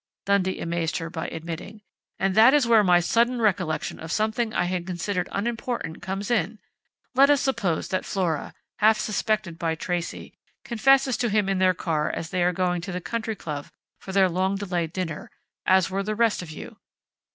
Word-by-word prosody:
_" - - -68
Dundee 195 -2 +1
amazed 170 0 -1
her 165 -1 -5
by 160 -1 -4
admitting. 170 +6 -7 0.3
"And 195 0 +1
that 225 +7 +7
is 290 -4 +4
where 230 -2 +5
my 180 -2 +5
sudden 235 +7 +2
recollection 180 -8 0
of 160 0 -7
something 220 +3 0
I - - +1
had 175 0 -2
considered 180 +1 -2
unimportant 230 -5 -3
comes 195 +3 -4
in! 215 -1 0 0.6
Let 275 +2 +6
us 290 -1 +5
suppose 195 - -1
that 185 - -1
Flora, 175 -6 -2 0.2
half 220 +1 +5
suspected 215 -4 -1
by 165 -1 0
Tracey, 175 +1 -4 0.3
confesses 260 +2 +3
to 240 - 0
him 210 -1 +2
in 195 -1 0
their 185 -1 +4
car 155 -3 -1
as 165 - -5
they 185 -2 0
are 175 +1 +3
going 180 -1 0
to 190 +3 -6
the 180 - -3
Country 225 +3 -3
Club 150 -5 -6 0.3
for 190 - -8
their 190 -1 +4
long 185 +2 0
delayed 180 -5 -2
dinner, 175 -4 -4 0.4
as 190 -1 +4
were 195 +1 -1
the 215 +2 -2
rest 225 -3 +2
of 175 - -9
you. 155 - -9
190 Hz, 190 wpm, -25 LUFS, 170-220 Hz, 0.6 s, that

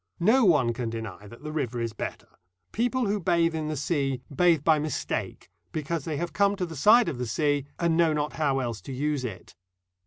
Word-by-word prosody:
No 225 +8 +4
one 140 -10 +4
can 115 0 -3
deny 115 -3 -7
that 115 +6 -13
the 150 - -5
river 130 -6 -2
is 115 -1 -2
better. - - -7 0.3
People 245 +2 0
who 205 0 0
bathe 170 -2 +2
in 155 -1 -2
the 155 -1 -3
sea 135 -3 -1
bathe 170 -3 +4
by 155 -1 +4
mistake, 150 -2 -3 0.2
because 155 0 -3
they 155 -3 -2
have 170 0 -3
come 200 0 +3
to 185 -2 -2
the 165 -2 -8
side 215 - +6
of 145 -7 -3
the 125 - -2
sea, 145 +3 0
and 170 -1 +1
know 170 -2 +4
not 150 -1 -1
how 145 -4 +1
else 120 -4 -3
to 135 - -9
use 145 +1 -1
it. 105 -7 -7
150 Hz, 215 wpm, -27 LUFS, 130-170 Hz, 0.3 s, side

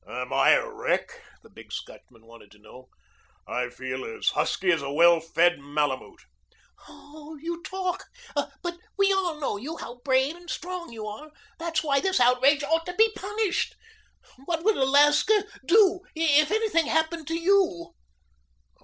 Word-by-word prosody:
"Am 125 +1 -5
I - - +5
a - - +1
wreck?" - - -3 0.2
the - - -18
big - - -15
Scotchman 115 -2 -10
wanted 115 -2 -16
to - - -20
know. 125 +4 -16 0.6
"I 125 0 -2
feel 130 +1 -6
as 115 - -1
husky 185 -1 0
as 165 - +1
a 140 0 -5
well 170 +3 +5
fed 165 +1 +2
malamute." 145 -1 -3 0.7
"Oh, 300 +1 -13
you 335 +2 -5
talk. 375 -1 -4 0.3
But 345 0 -4 0.2
we 395 0 +4
all 355 -5 -1
know 275 -8 -2
you 300 +10 -7
how 240 -2 -9
brave 265 +2 +2
and 350 -1 -14
strong 360 -1 -5
you 220 -2 -7
are. 255 +9 -8 0.3
That's 330 -1 -1
why 280 -3 +2
this 380 -3 +1
outrage 255 +4 +4
ought 325 +3 0
to 360 - -5
be 445 +2 +4
punished. 415 -1 -2 0.7
What 330 0 -2
would 435 +1 +3
Alaska 295 +10 +4 0.2
do 380 0 +5 0.2
if 305 -1 +3
anything 420 -7 +1
happened 320 0 -1
to 325 - -2
you?" 335 - +1
300 Hz, 160 wpm, -26 LUFS, -, 0.7 s, I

